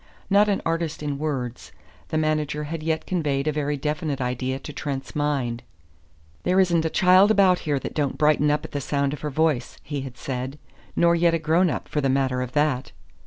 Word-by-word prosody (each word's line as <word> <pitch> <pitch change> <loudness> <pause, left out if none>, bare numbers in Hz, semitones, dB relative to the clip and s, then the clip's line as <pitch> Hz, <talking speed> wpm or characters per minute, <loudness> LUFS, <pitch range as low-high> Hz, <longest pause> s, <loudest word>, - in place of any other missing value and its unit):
Not 205 +1 +5
an 200 - 0
artist 165 -2 -2
in 145 -2 -3
words, 130 -6 -4 0.4
the 155 - -2
manager 155 -1 0
had 155 +2 -5
yet 160 0 -1
conveyed 150 -6 -1
a - - +3
very 145 -1 -1
definite 150 0 -2
idea 130 +1 -2
to 150 +2 -9
Trent's 135 -2 -5
mind. 135 -6 -1 0.8
"There 185 +1 +2
isn't 170 -3 +3
a - - +1
child 185 +4 +5
about 195 -4 +4
here 145 - +2
that - - -5
don't 145 -3 -1
brighten 150 -1 +3
up 150 +1 0
at - - -9
the 145 - -3
sound 140 0 0
of 150 - -7
her 150 - -2
voice," 150 -4 0
he 145 -1 -4
had 130 -2 -8
said, 130 +2 -4 0.4
"nor 170 0 +4
yet 170 0 +3
a - - +2
grown 165 +3 +2
up, - - -4
for 150 - -1
the 135 - +1
matter 130 -1 +1
of 125 -1 -5
that. 145 -3 +1
150 Hz, 210 wpm, -24 LUFS, 135-160 Hz, 0.8 s, Not